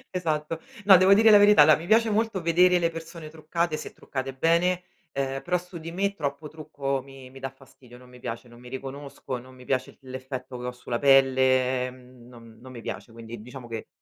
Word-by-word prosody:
Esatto. 160 -2 -2 0.2
No, 195 -2 +9
devo 185 +2 +6
dire 220 +2 +6
la 210 - +9
verità, 205 -6 +7
allora 155 0 +7
mi 165 +3 -8
piace 225 +1 +4
molto 215 -3 0
vedere 180 +2 +4
le 170 -1 +1
persone 165 -1 -9
truccate, 160 +1 -2
se 155 - -7
truccate 130 -1 -6
bene, 170 +5 +2 0.3
ehm, 135 0 -3
però 180 0 +1
su 180 0 -10
di 165 +1 -8
me 200 +3 -1
troppo 150 -2 -4
trucco 145 -3 -4
mi 135 -1 -13
mi 135 +1 -13
dà 135 0 -4
fastidio, 130 -2 -18
non 125 0 -16
mi 125 0 -15
piace, 115 +2 -6
non 120 0 -16
mi 125 - -12
riconosco, 135 0 -6
non 130 +1 -15
mi 125 0 -15
piace 130 0 -2
l'effetto 130 0 -7
che 125 0 -6
ho - - -2
sulla 125 -1 -5
pelle, 130 -2 +3
mhmm, 125 -1 -17
non 115 -2 -15
non 130 +1 -12
mi 120 - -9
piace. 115 - -7
Quindi 115 -1 -10
diciamo 125 +1 -10
che 115 -1 -6
135 Hz, 215 wpm, -26 LUFS, 125-170 Hz, 0.3 s, No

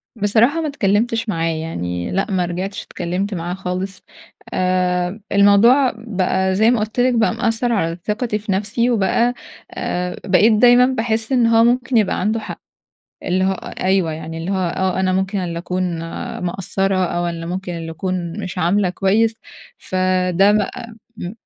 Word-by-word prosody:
بصراحة 230 +9 +2
ما 310 - -2
اتكلّمتش 230 -2 0
معاه، 165 -3 0
يعني 90 - -4
لأ، 195 +2 -1
ما 180 -2 +1
رجعتش 185 +3 -4
اتكلّمت 185 +4 -3
معاه 175 0 -3
خالص. 185 0 -4 0.5
آآ، 180 +1 0
الموضوع 210 +7 +5
بقى 190 -4 -1
زي 220 +4 +4
ما 245 - +1
قُلت 215 +3 -3
لِك 250 +1 +3
بقى 225 -1 +2
مأثّر 230 +1 0
على 165 -6 0
ثقتي 215 0 -1
في 205 -1 -4
نفسي 210 +5 0
وبقى 235 +2 +2 0.4
آآ، 180 0 -3
بقيت 205 +3 +4
دايمًا 245 +3 +6
باحس 225 -2 -1
إن 245 -3 +3
هو 230 0 +5
ممكن 245 +1 +2
يبقى 215 -3 +1
عنده 215 +4 0
حق، - - -8 0.6
اللي 185 +1 0
هو 190 - +2
أ 185 - -7
أيوه. 185 -4 +2
يعني 160 +1 -6
اللي 165 +3 -4
هو 185 -3 0
آه، 190 0 0
أنا 185 0 +1
ممكن 190 +2 -1
اللي 170 -2 -3
أكون 180 -1 -2 0.5
مقصّرة 190 +1 0
أو 175 0 -1
اللي 165 -1 -5
ممكن 180 +1 -4
اللي 165 -1 -6
أكون 170 0 -4
مش 185 - -6
عاملة 180 +2 +2
كويس، 215 +5 +2 0.4
فده 185 +1 +2
بقى 220 +3 -2 0.2
م 175 - -5
190 Hz, 165 wpm, -19 LUFS, 180-225 Hz, 0.6 s, دايمًا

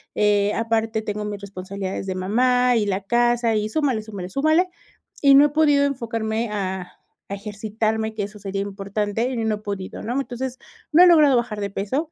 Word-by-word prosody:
eh, 205 0 +2
aparte 225 -1 0
tengo 210 -1 -4
mis 205 -1 -5
responsabilidades 195 0 -5
de 190 - -2
mamá 250 +6 +2
y 215 - +1
la 195 -1 0
casa, 240 +2 +2
y 210 0 -1
súmale, 265 -4 0
súmale, 200 -4 -7
súmale, 310 - +2 0.5
y 275 -1 +7
no 280 +1 +8
he - - +2
podido 290 -1 +3
enfocarme 230 -4 -2
a 190 -3 -4 0.4
a - - -4
ejercitarme, 220 +2 -2
que 205 - -2
eso 210 +1 -8
sería 195 0 -3
importante, 205 +3 -2
y 260 - -4
no 220 -1 0
he - - -8
podido, 200 -3 -6
¿no? 245 +4 -1
Entonces, 260 -1 -5 0.4
no 330 - +7
he - - +8
logrado 300 -6 +6
bajar 235 -3 -2
de 200 -1 -3
peso, 260 +12 -2
220 Hz, 190 wpm, -22 LUFS, 200-250 Hz, 0.5 s, no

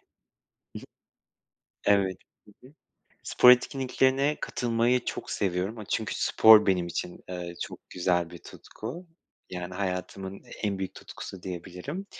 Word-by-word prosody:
hı. - - -42 1.9
Evet. 95 -2 0 0.3
Hı 105 - -17
hı. 140 - -18 0.5
Spor 125 - +6
etkinliklerine 130 +3 +2
katılmayı 120 +1 +1
çok - - -5
seviyorum, 95 +3 -1
aaa, 105 - -7
çünkü - - -2
spor 110 -1 +7
benim 90 -3 +2
için, 85 +1 -5
eee, 90 -1 -5
çok - - -10
güzel 90 -2 0
bir 85 - -10
tutku. 170 - -9 0.4
Yani 90 0 -6
hayatımın 95 0 -4 0.2
en 100 -2 -1
büyük 95 -1 -4
tutkusu 95 -2 -9
diyebilirim, 95 - -6
95 Hz, 125 wpm, -28 LUFS, 90-125 Hz, 1.9 s, spor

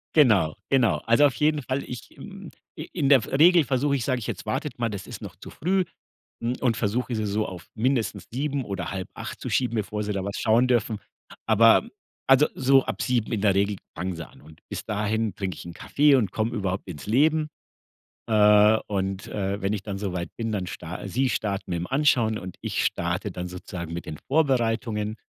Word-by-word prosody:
Genau, 105 - +5
genau. 125 -8 +3
Also, 115 +6 +5
auf 135 -5 +2
jeden 150 +2 +2
Fall, 130 +2 -2
ich 125 - -8
hm, 195 -3 -10 0.3
i 155 - -7
in 150 -6 0
der 135 -4 +7
v - - -8
Regel 170 +4 +6
versuche 140 +2 +1
ich 130 - -1
sage 130 -1 0
ich: 110 - -6
„Jetzt - - -5
wartet - - -3
mal, 115 -1 0
das 100 -2 -6
ist - - -8
noch - - -8
zu - - -11
früh“ 185 +2 0 0.6
hm, 120 +2 0
und 120 -3 +2
versuche, 120 +3 -1
sie 110 -1 -1
so 105 +1 0
auf 90 -2 -9
mindestens 120 +1 0
7:00 140 +1 -2
oder 100 -1 -4
7:30 95 -1 -6
zu - - -4
schieben, 125 -2 +1
bevor 105 0 -2
sie 105 - -3
da 95 -1 -2
was 100 0 -4
schauen 115 +3 +3
dürfen. 115 -3 +1 0.5
Aber 115 - +5 0.4
also, 135 +2 +6
so 135 0 +4
ab - - -4
7:00 120 -4 0
in 105 - -1
der 100 -2 +3
Regel 100 0 +1 0.2
fangen 90 0 -3
sie 85 -1 -7
an. - - -19
Und 80 +1 -16
bis - - -5
dahin 105 0 -1
trinke 95 -5 -3
ich - - -10
'n 85 - -8
Kaffee 145 - +3
und 105 -8 +1
komme 110 +1 -1
überhaupt 95 -4 -3
ins 75 -6 -8
Leben. 150 +6 +3 0.8
Äh, 105 0 +6
und, 95 -1 -2
äh, 100 0 -2
wenn 100 +2 0
ich 105 - -3
dann 100 -1 -5
so 100 -3 -3
weit 85 0 -4
bin, 115 -1 -3
dann 95 -3 -2
star 90 +2 -7
sie 130 +7 +1
starten 105 -2 -2
mit 85 - -1
dem 85 - -3
Anschauen 125 -6 +2
und 95 -3 -8
ich - - -1
starte 90 +4 -1
dann 90 0 -5
sozusagen 85 -2 -7
mit 85 - -5
den 75 - -6
Vorbereitungen, 115 -7 +1
110 Hz, 215 wpm, -25 LUFS, 100-130 Hz, 0.8 s, der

